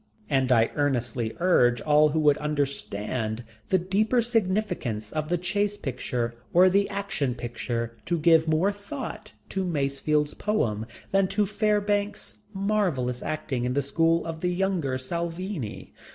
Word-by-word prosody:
And 135 -2 +2
I 115 -2 +4
earnestly 120 -5 0
urge 125 -10 +4
all 150 +2 +4
who 160 +2 0
would 150 -1 +4
understand 120 -6 -2 0.3
the 190 - +4
deeper 200 +7 +1
significance 185 - 0
of 155 -1 -3
the 175 - +2
"chase 205 +4 0
picture" 125 - -3 0.2
or 185 +2 +6
the 200 +1 +2
"Action 150 -11 -2
Picture" 115 -1 -3
to 170 - +1
give 160 0 +4
more 160 +6 +3
thought 215 +2 -7 0.2
to 190 - -1
Masefield's 150 -2 0
poem 115 - -1 0.2
than 195 -1 +3
to 205 +2 +1
Fairbanks' 205 - 0
marvellous 190 - 0
acting 135 -5 -2
in 125 0 0
the 140 +1 +1
school 165 +4 +2
of 165 -1 -5
the 180 - +1
younger 175 -7 0
Salvini. 170 - -4
160 Hz, 140 wpm, -26 LUFS, 125-195 Hz, 0.3 s, or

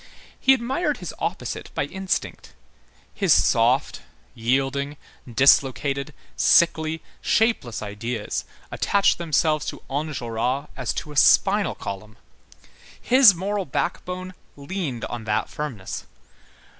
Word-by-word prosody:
He 265 - +5
admired 265 +8 -1
his - - -7
opposite - - -4
by - - 0
instinct. 190 -1 -4 0.6
His 195 -4 0
soft, 120 -1 +3 0.3
yielding, 135 +4 -1 0.3
dislocated, 140 +3 +3 0.2
sickly, 160 -2 +3 0.2
shapeless 215 - +1
ideas 105 +2 -4 0.3
attached 200 -3 +2
themselves 155 -2 +1
to - - -6
Enjolras 135 -3 -2
as 130 -4 -2
to 150 - -5
a - - -10
spinal 200 +8 +4
column. 105 +2 -7 0.8
His 250 -6 +6
moral 195 +2 -2
backbone 180 +5 -3 0.2
leaned 145 -4 -4
on 120 -2 -6
that 105 -1 -1
firmness. 130 -11 -6
145 Hz, 105 wpm, -23 LUFS, 120-185 Hz, 0.8 s, His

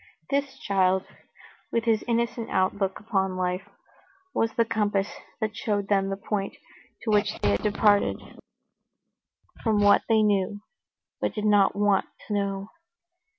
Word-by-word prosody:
This 280 -1 -1
child, 190 -1 +1 0.7
with 230 - +1
his 225 -2 +2
innocent 235 -1 -1
outlook 190 +1 0
upon 190 -4 -1
life, 180 0 -2 0.6
was 225 0 +1
the 230 - +2
compass 210 -3 0 0.3
that 220 -1 -2
showed 205 -2 -1
them 195 -1 +2
the 195 - -2
point 200 0 -3 0.5
to 220 - -1
which 210 0 +2
they 105 - +1
had 100 - +1
departed 205 -1 +3 1.4
from 220 -3 +2
what 205 0 +6
they 220 -1 +4
knew, 205 -1 +1 0.6
but - - -2
did 210 -1 -2
not 205 -2 +4
want 205 -1 +2 0.2
to 210 - -4
know. 200 0 -2
205 Hz, 140 wpm, -26 LUFS, 195-220 Hz, 1.4 s, what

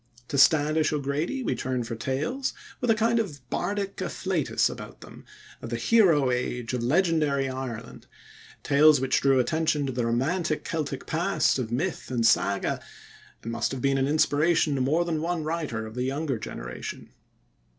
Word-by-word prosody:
To 140 - -2
Standish 155 +2 +4
O'Grady 150 - -2
we - - 0
turn 130 -2 -2
for 115 0 -5
tales, 145 - -2 0.3
with 245 - -1
a 225 - +5
kind 230 +2 +2
of 150 - -5
bardic 200 -1 -2
afflatus - - 0
about - - -8
them, - - -13 0.4
of - - -7
the - - -2
hero 165 - +4
age 125 -1 -2
of 125 - -1
legendary 150 -1 +2
Ireland 130 -3 -6 0.6
tales 150 0 +5
which 130 0 +1
drew 135 -1 +4
attention 155 +3 +1
to 135 - -2
the 120 -2 -1
romantic 155 +7 0
Celtic 145 -4 -3
past 170 -3 +1
of 115 -3 -3
myth 160 +9 -2
and 120 -3 0
saga, 100 -3 +2 0.6
and 115 - -4
must 115 0 -1
have 130 - -4
been 135 0 +2
an 135 - +1
inspiration 155 +1 +2
to 135 - -1
more 155 +7 +2
than 160 -3 -1
one 170 -1 -1
writer 150 -9 -3
of 110 - -9
the 125 - -4
younger 135 -1 -2
generation. 65 - -7
145 Hz, 170 wpm, -26 LUFS, 125-165 Hz, 0.6 s, a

